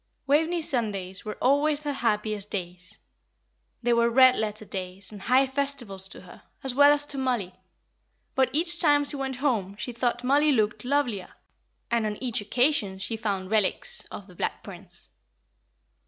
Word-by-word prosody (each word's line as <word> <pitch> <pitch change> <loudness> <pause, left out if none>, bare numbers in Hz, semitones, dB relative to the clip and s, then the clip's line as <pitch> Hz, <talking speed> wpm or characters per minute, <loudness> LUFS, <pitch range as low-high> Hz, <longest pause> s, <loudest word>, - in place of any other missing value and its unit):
Waveney's 320 +4 +2
Sundays 200 -7 -2
were 215 - -6
always 285 +3 +2
her 290 -1 -2
happiest 210 -4 -1
days; 180 -2 -6 0.9
they 240 0 +3
were 235 0 +3
red 255 +1 +6
letter 215 0 -3
days 185 0 -6
and 205 -2 -10
high 255 +5 +4
festivals 265 -8 -3
to - - -12
her, 180 - -14 0.2
as 265 -2 -1
well 285 +2 +7
as 290 0 +2
to 280 -2 -5
Mollie; 240 -9 -1 0.8
but 260 -1 +2
each 340 +4 +4
time 290 -2 +4
she 285 - +2
went 270 -1 -3
home 230 -8 -1
she 225 +4 -5
thought 240 0 -1
Mollie 290 +3 +4
looked 215 -2 0
lovelier, 250 -8 -1 0.6
and 230 -2 +1
on 210 -1 -4
each 245 -5 -1
occasion 215 -2 +1
she 195 +4 -3
found 200 -4 -3
relics 210 -4 +1
of 200 - -8
the 185 - -16
Black - - -3
Prince. - - -8
235 Hz, 165 wpm, -26 LUFS, 205-280 Hz, 0.9 s, well